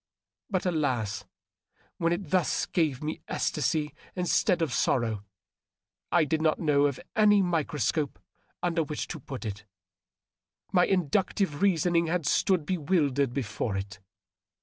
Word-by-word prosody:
But 190 -3 -1
alas! 130 - -1 0.7
when 170 0 +2
it 175 -3 -3
thus 185 -4 +2
gave 155 -6 0
me 155 +1 -4
ecstasy 150 0 -1 0.2
insteaa 180 +1 +2
of 150 - -1
sorrow 110 -5 +1 0.9
I 170 -3 +4
did 155 +2 0
not 155 -1 +2
know 145 -3 +3
of 140 - -4 0.2
any 205 -2 +5
microscope 155 -3 0 0.5
under 170 -1 +1
which 150 -1 -3
to 160 - -5
put 130 -2 -7
it. 105 -1 -5 1.1
My 180 -2 +4
inductive 185 -1 0
reasoning 170 -3 +3
had 170 -1 -1
stood 175 +1 +2
bewildered 145 -6 +1
before 110 -4 -2
it. 100 +2 -6
155 Hz, 125 wpm, -28 LUFS, 140-175 Hz, 1.1 s, any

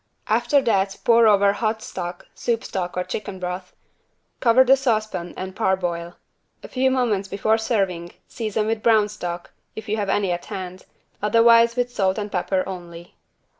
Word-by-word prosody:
After 240 +5 +2
that 195 -4 +1
pour 230 -1 +5
over 200 -1 +5
hot 220 +1 -2
stock 175 -1 -6
(soup 230 -1 -2
stock 180 -2 -4
or 180 - 0
chicken 195 0 -5
broth) 180 0 -5 0.7
cover 250 +1 +5
the 260 +1 +6
saucepan 215 -9 -2
and 190 0 -6
parboil. 175 -3 -1 0.5
A - - -7
few 260 0 +1
moments 235 -7 0
before 215 +3 +1
serving 190 -7 -1
season 215 -2 -2
with 220 0 -1
brown 215 -2 +4
stock, 175 -4 -6 0.2
if 220 0 -8
you 215 +1 -1
have 205 -2 -2
any 195 -2 +1
at 175 0 -3
hand, 185 -3 -7 0.3
otherwise 230 +2 +5
with 245 -1 -1
salt 190 -3 +1
and 210 -1 -4
pepper 185 +1 0
only. 175 -2 -9
205 Hz, 165 wpm, -22 LUFS, 185-230 Hz, 0.7 s, the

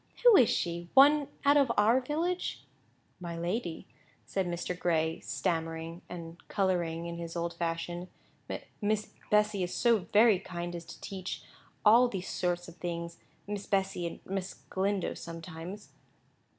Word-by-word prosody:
Who 485 -3 +9
is 245 - +7
she? 170 0 -1
One 285 +1 +7 0.2
out 285 +1 +6
of 275 -4 +4
our 235 +5 +5
village?" 330 +7 -2 0.6
"My 170 -2 -5
lady," 175 0 -2 0.4
said 190 -2 -1
Mr. 175 +1 -2
Gray, 160 -2 +1
stammering 165 - -2
and 170 -1 -8
colouring 175 -4 0
in 170 0 -5
his 170 0 -6
old 170 0 -2
fashion, 170 +1 -3 0.7
"Miss 215 0 0 0.2
Bessy 210 -1 +3
is 180 0 -2
so 235 -2 +4
very 215 -2 +6
kind 175 -2 -5
as 170 -1 -6
to - - -11
teach 190 -2 -5 0.4
all 235 +4 +8
those 190 -6 -4
sorts 175 -1 -1
of 170 0 -12
things—Miss 170 +3 -6
Bessy, 195 -3 0
and - - -7
Miss 190 0 -4
Galindo, 195 0 0
sometimes." 165 +4 -8
180 Hz, 140 wpm, -31 LUFS, 170-210 Hz, 0.7 s, Who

